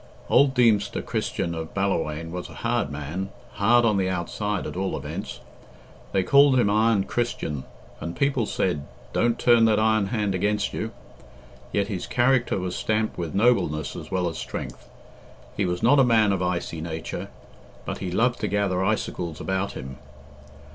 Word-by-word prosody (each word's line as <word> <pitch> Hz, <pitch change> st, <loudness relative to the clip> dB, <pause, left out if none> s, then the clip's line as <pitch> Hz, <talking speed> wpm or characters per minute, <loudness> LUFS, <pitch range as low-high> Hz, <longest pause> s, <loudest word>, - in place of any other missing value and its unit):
Old 140 Hz, -1 st, +5 dB
Deemster 115 Hz, -5 st, +3 dB
Christian 85 Hz, -, -2 dB
of 80 Hz, -1 st, -6 dB
Ballawhaine 80 Hz, -5 st, -1 dB
was 90 Hz, +1 st, -5 dB
a -, -, -11 dB
hard 70 Hz, -, +1 dB
man 75 Hz, +7 st, -4 dB, 0.2 s
hard 115 Hz, +4 st, +4 dB
on 105 Hz, -3 st, +3 dB
the 95 Hz, -1 st, +1 dB
outside, 100 Hz, +3 st, -2 dB
at -, -, -5 dB
all 95 Hz, +1 st, -2 dB
events. -, -, -6 dB, 0.7 s
They 95 Hz, -, +2 dB
called 140 Hz, +3 st, +6 dB
him 100 Hz, -4 st, +3 dB
Iron 110 Hz, -1 st, +3 dB
Christian, 80 Hz, -, -2 dB, 0.3 s
and 85 Hz, +2 st, -5 dB
people 135 Hz, -5 st, +1 dB
said, 75 Hz, -6 st, -1 dB, 0.3 s
"Don't 120 Hz, 0 st, +2 dB
turn 120 Hz, -2 st, +5 dB
that 110 Hz, -1 st, +4 dB
iron 110 Hz, -2 st, +3 dB
hand 105 Hz, -2 st, -1 dB
against 105 Hz, +2 st, 0 dB
you." 110 Hz, -, -3 dB, 0.8 s
Yet 100 Hz, -, +1 dB
his 95 Hz, -4 st, -4 dB
character 125 Hz, 0 st, +2 dB
was 90 Hz, -1 st, -3 dB
stamped 110 Hz, -2 st, -1 dB
with 85 Hz, 0 st, -4 dB
nobleness 95 Hz, -, +2 dB
as -, -, -8 dB
well 90 Hz, -1 st, 0 dB
as 80 Hz, -, -4 dB
strength. -, -, -6 dB, 0.7 s
He 100 Hz, -, 0 dB
was 90 Hz, 0 st, -2 dB
not 145 Hz, -, +6 dB
a -, -, +7 dB
man 110 Hz, -4 st, +4 dB
of 95 Hz, -2 st, 0 dB
icy 90 Hz, -3 st, -2 dB
nature, 80 Hz, -1 st, -5 dB, 0.6 s
but -, -, -4 dB
he 95 Hz, -, -3 dB
loved 120 Hz, +7 st, +1 dB
to -, -, -1 dB
gather 100 Hz, -3 st, 0 dB
icicles 90 Hz, -5 st, -2 dB
about 95 Hz, +1 st, -2 dB
him. 65 Hz, +1 st, -7 dB
100 Hz, 170 wpm, -25 LUFS, 85-110 Hz, 0.8 s, a